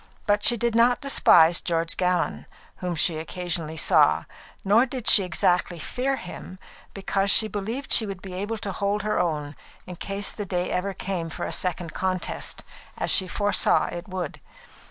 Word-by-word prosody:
But 205 -1 +1
she 240 - +6
did 235 +1 -1
not 235 +2 +3
despise 175 - +4
George 165 -1 -1
Gallon, 180 -1 -1 0.3
whom 180 -1 -4
she 160 +1 +1
occasionally 165 -2 -4
saw, - - +3 0.4
nor 220 +6 +4
did 250 -2 -6
she 220 - +7
exactly 180 -1 0
fear 255 +11 -2
him, 185 -3 -10 0.4
because 195 0 -1
she 220 +2 +6
believed 220 +7 -5
that - - +7
she 220 - +7
would 195 -2 -6
be 185 -1 -10
able 205 +5 -4
to 205 -2 -5
hold 200 +1 -2
her 215 - -1
own 150 -4 -2 0.3
in 180 -1 -9
case 195 +2 -4
the 210 - -6
day 180 -2 -3
ever 195 +2 -2
came 180 -4 -4
for - - -5
a - - -3
second 175 -2 -2
contest, 185 -1 -3 0.3
as - - 0
she 190 - +5
foresaw 205 +3 +2
it 175 +1 -7
would. 185 -5 -6
190 Hz, 175 wpm, -24 LUFS, 175-210 Hz, 0.4 s, she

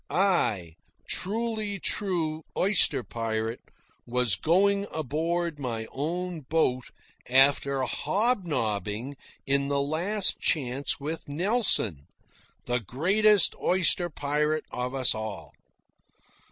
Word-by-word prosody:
I, 180 - +2
a 85 -5 -11 0.3
truly 215 0 -1
true 165 -6 -1 0.2
oyster 180 -9 +3
pirate, 115 0 -3 0.5
was 125 -3 +1
going 200 - +2
aboard 160 +2 -2
my 115 -4 -4
own 170 +4 -3
boat 130 -3 0 0.4
after 135 +1 +3
hob 210 - 0
nobbing 110 - -3 0.3
in 140 0 +1
the 140 0 0
Last 175 +8 +2
Chance 135 -2 0
with 155 +2 -5
Nelson, 160 - +2 0.6
the 120 0 0
greatest 190 - +3
oyster 180 -1 +2
pirate 150 +1 -1
of 125 +2 -4
us 130 -2 +2
all. 100 -9 -7
150 Hz, 100 wpm, -27 LUFS, 125-180 Hz, 0.6 s, oyster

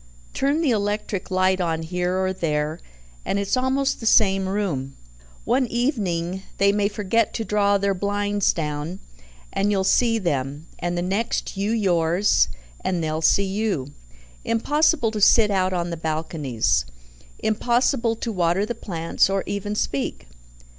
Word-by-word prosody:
"Turn 285 +4 +1
the 295 -6 +2
electric 205 -2 -2
light 185 0 +2
on 165 -2 -1
here 180 +2 -1
or 190 0 0
there, 155 -2 -1 0.4
and - - -1
it's 200 +3 0
almost 265 +2 0
the 225 - -3
same 195 -4 +4
room. 160 -10 -2 0.5
One 255 +1 +2
evening 190 - -1 0.2
they 200 0 +4
may 205 0 +1
forget 210 +2 0
to 225 - -2
draw 205 -1 +2
their 200 0 +1
blinds 205 +1 0
down, 150 +2 -4 0.6
and 200 - +1
you'll 195 -2 +1
see 230 +3 +3
them; 145 -5 -2
and 175 0 -2
the 175 - -1
next, 200 +6 -2
you 200 +2 -1
yours, 185 -3 +2 0.4
and 175 -3 -1
they'll 155 0 -2
see 195 +5 +4
you. 195 -9 -2 0.5
Impossible 285 +1 +2
to 215 -1 -4
sit 210 +1 +6
out 185 -1 +1
on 175 -1 -2
the 170 - -4
balconies. 150 - -1 0.5
Impossible 235 +1 +1
to 230 +1 -4
water 180 0 +1
the 240 - -3
plants, 170 -6 0
or 195 0 0
even 205 +1 -3
speak. 140 - -2
195 Hz, 150 wpm, -23 LUFS, 170-215 Hz, 0.6 s, sit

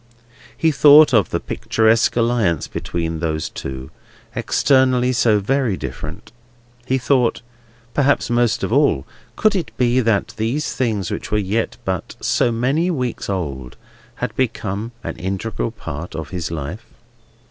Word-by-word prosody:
He 160 - +3
thought 145 0 +7
of 110 -5 +4
the - - -1
picturesque 110 0 +1
alliance 115 -9 +1
between 80 -1 -3
those 80 -2 -2
two, 65 0 -7 0.4
externally 130 -2 +3
so 115 -3 +3
very 120 -1 0
different. 75 +7 -7 0.6
He 130 - +2
thought—perhaps 120 +1 -1
most 120 -1 +2
of - - -1
all—could 140 - +1
it 175 -5 -1
be 125 0 +3
that 115 -5 +1
these 120 +8 -1
things 110 -8 -1
were 105 - -2
yet 105 +3 -1
but - - -3
so 120 - +1
many 135 +10 +1
weeks 125 - -3
old, 70 -10 -4
and - - -24 0.4
had - - -4
become 110 -3 -2
an - - -5
integral 95 +5 -3
part 85 -7 -7
of 80 0 -5
his 90 -4 -3
life? 80 +5 -6
115 Hz, 135 wpm, -20 LUFS, 90-130 Hz, 0.6 s, thought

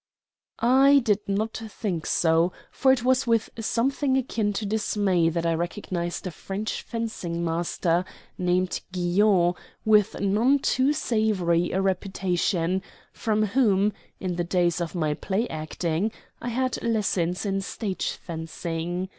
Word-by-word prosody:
I 270 +4 +5
did 210 -2 +3
not 215 +3 -1
think 195 -6 -3
so; 165 +1 +3 0.2
for 265 - +3
it 255 -3 +2
was 260 +1 +2
with 230 -1 +2
something 265 +4 +1
akin 225 -5 0
to 210 +2 -3
dismay 200 -5 +1
that 170 0 -2
I 165 - +2
recognized 175 +1 -3
a 185 - -3
French 195 +6 -4
fencing 190 -8 -4
master, 170 +1 0 0.3
named 180 0 0
Guion, 180 0 +3 0.3
with 210 -2 +4
none 215 +8 +3
too 270 0 +2
savory 205 - +1
a 190 +1 0
reputation, 185 -1 0 0.3
from 215 -1 0
whom, 210 -3 +2 0.3
in 180 -2 -3
the 175 - +1
days 175 0 +1
of 170 +1 -4
my 155 -3 +1
play 200 +9 -1
acting, 160 +5 -2 0.3
I 245 - -3
had 255 +1 -1
lessons 195 -5 0
in 195 -1 0
stage 195 0 -3
fencing. 165 +2 -4
195 Hz, 135 wpm, -26 LUFS, 175-220 Hz, 0.3 s, I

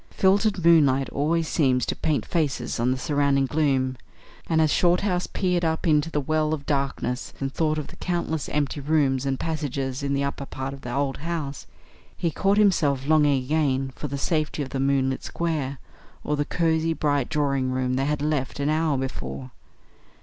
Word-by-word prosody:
Filtered 195 -1 +2
moonlight 140 -5 +5
always 160 +3 0
seems 130 -7 +2
to - - -2
paint 140 -9 -1
faces 140 -9 -1
on 120 +2 +2
the 130 - +1
surrounding 140 0 +1
gloom, 135 -3 +1 0.5
and 160 -1 +2
as 155 -1 +3
Shorthouse 180 +1 +2
peered 180 -2 0
up 160 +1 0
into 155 -1 +3
the 150 - -1
well 155 +2 0
of 140 -2 -11
darkness 135 -3 -2
and 135 0 -3
thought 155 -1 0
of 150 - -3
the - - -13
countless 170 -4 -2
empty 145 0 -1
rooms 140 -2 +1
and 135 -1 -1
passages 140 -4 -3
in 140 0 -1
the 140 - 0
upper 140 0 -3
part 135 +1 -5
of 135 - -10
the 125 - -6
old 140 +1 -1
house, 155 -3 -4 0.5
he 170 - 0
caught 195 +5 +1
himself 150 -10 +3
longing 145 -3 +3
again 135 -2 0
for 150 - -5
the 140 0 -4
safety 155 0 -1
of 135 - -7
the 135 - -3
moonlit 135 -1 +1
square, 150 -5 -2 0.5
or 150 - 0
the 145 0 -1
cosy, 165 0 +1
bright 145 -5 0
drawing 140 -4 0
room 130 0 0
they 135 +1 0
had 150 0 -1
left 150 -4 -1
an 140 +1 0
hour 155 -2 +1
before. 65 - -5
145 Hz, 185 wpm, -25 LUFS, 135-160 Hz, 0.5 s, moonlight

